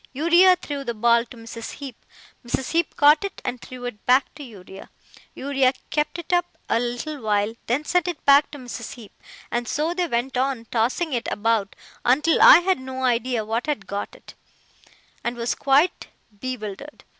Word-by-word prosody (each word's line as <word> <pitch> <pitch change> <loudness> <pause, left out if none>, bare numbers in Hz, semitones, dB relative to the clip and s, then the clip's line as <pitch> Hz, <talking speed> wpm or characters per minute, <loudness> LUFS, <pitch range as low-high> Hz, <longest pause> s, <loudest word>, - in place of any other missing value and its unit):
Uriah 345 +6 +5
threw 290 -5 -6
the 235 -3 -4
ball 235 +1 +3
to 240 - -14
Mrs. 230 0 -8
Heep, 275 -4 -8 0.5
Mrs. 250 +2 -3
Heep 335 +1 0
caught 300 +3 +5
it 395 -1 -5
and 250 -1 -3
threw 250 -1 -9
it 230 -4 -7
back 255 +2 +3
to 290 - -12
Uriah, 195 -6 -12 0.5
Uriah 270 -1 +1 0.2
kept 300 +2 -1
it 345 +1 -5
up 350 0 0
a 230 - +2
little 245 +5 -4
while, 210 0 0
then 270 +6 0
sent 360 +1 +1
it 350 -4 -5
back 280 +1 +6
to 290 - -9
Mrs. 245 -3 -7
Heep, 225 -4 -13 0.4
and 240 0 -2
so 310 +3 -1
they 355 -1 -1
went 250 0 -2
on 255 -3 -1
tossing 255 +8 0
it 240 - -2
about 210 -2 0 0.3
until 295 +6 +3
I 335 - +9
had 375 -2 +1
no 260 0 -6
idea 245 -2 0
who 220 - -6
had 290 -9 -3
got 200 +1 -5
it, - - -15 0.9
and 240 +1 -2
was 235 0 -1
quite 285 +6 +2 0.3
bewildered. 255 +2 -6
255 Hz, 180 wpm, -23 LUFS, 235-300 Hz, 0.9 s, I